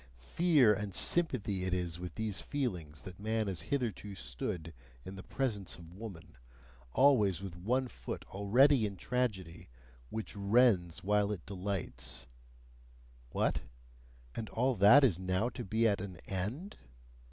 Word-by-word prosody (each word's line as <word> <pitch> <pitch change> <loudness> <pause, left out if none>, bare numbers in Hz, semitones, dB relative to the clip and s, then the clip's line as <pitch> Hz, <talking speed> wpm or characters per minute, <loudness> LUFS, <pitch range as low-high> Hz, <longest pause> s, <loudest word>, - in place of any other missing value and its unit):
Fear 130 - +4
and 100 -2 -4
sympathy 115 - +1
it 90 0 0
is 85 -2 -3
with 90 0 -7
these 110 -3 -2
feelings 85 - -4
that 90 +2 -10
man 110 +1 0
has 95 -5 -3
hitherto 110 -6 -3
stood 80 +4 -5 0.3
in 95 - -7
the 95 - -8
presence 105 -6 -2
of 85 0 -13
woman, 95 - -10 0.5
always 105 - +4
with 95 -3 -6
one 125 +9 0
foot - - -7
already 110 +5 +4
in 100 -1 -8
tragedy, 105 -10 -2 0.4
which 110 -1 -5
rends 100 -4 +3
while 105 +1 +2
it 95 -5 -5
delights 90 -10 -3 1.0
What? - - 0 0.7
And 110 -2 -5
all 130 +3 +1
that 105 +9 +8
is 100 -10 +3
now 95 +5 0
to 125 0 -6
be 110 +3 +2
at 100 -3 +1
an 95 -3 -7
end? 110 - -4
100 Hz, 140 wpm, -33 LUFS, 90-120 Hz, 1.0 s, that